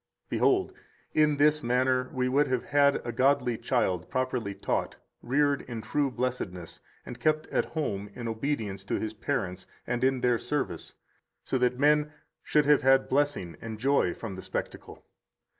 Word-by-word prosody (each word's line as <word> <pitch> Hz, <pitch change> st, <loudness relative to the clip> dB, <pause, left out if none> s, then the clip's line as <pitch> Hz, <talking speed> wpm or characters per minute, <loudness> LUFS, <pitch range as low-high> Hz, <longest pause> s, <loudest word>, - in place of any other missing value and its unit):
114 -, -, -2 dB, 0.4 s
Behold, 425 Hz, -, -24 dB, 0.3 s
in 150 Hz, -1 st, +3 dB
this 150 Hz, +1 st, +4 dB
manner 125 Hz, +1 st, +1 dB
we 125 Hz, -1 st, 0 dB
would 140 Hz, +3 st, +3 dB
have 130 Hz, -2 st, 0 dB
had 140 Hz, -1 st, +3 dB
a 120 Hz, -, -2 dB
godly 130 Hz, -1 st, +2 dB
child 90 Hz, -4 st, -1 dB
properly 125 Hz, -3 st, -2 dB
taught, -, -, -2 dB, 0.3 s
reared 140 Hz, +3 st, +1 dB
in 115 Hz, -2 st, -4 dB
true 140 Hz, +5 st, 0 dB
blessedness, 120 Hz, -9 st, -4 dB, 0.3 s
and -, -, -8 dB
kept 155 Hz, 0 st, +1 dB
at -, -, +1 dB
home 105 Hz, -11 st, -3 dB
in 120 Hz, -1 st, -5 dB
obedience 110 Hz, -4 st, -3 dB
to 100 Hz, -, -2 dB
his 110 Hz, 0 st, -3 dB
parents 105 Hz, -6 st, -3 dB, 0.2 s
and 125 Hz, 0 st, -2 dB
in 130 Hz, -1 st, +2 dB
their 120 Hz, -2 st, +2 dB
service, 145 Hz, -2 st, -3 dB, 0.5 s
so 130 Hz, -, -1 dB
that 125 Hz, 0 st, +1 dB
men 150 Hz, +2 st, +3 dB, 0.3 s
should 150 Hz, -1 st, +2 dB
have 145 Hz, -1 st, +5 dB
had 135 Hz, +1 st, +4 dB
blessing 135 Hz, -, 0 dB
and 110 Hz, -1 st, -6 dB
joy 135 Hz, -5 st, +2 dB
from 105 Hz, +2 st, -6 dB
the 95 Hz, -, -7 dB
spectacle. -, -, -6 dB
130 Hz, 165 wpm, -28 LUFS, 110-145 Hz, 0.5 s, have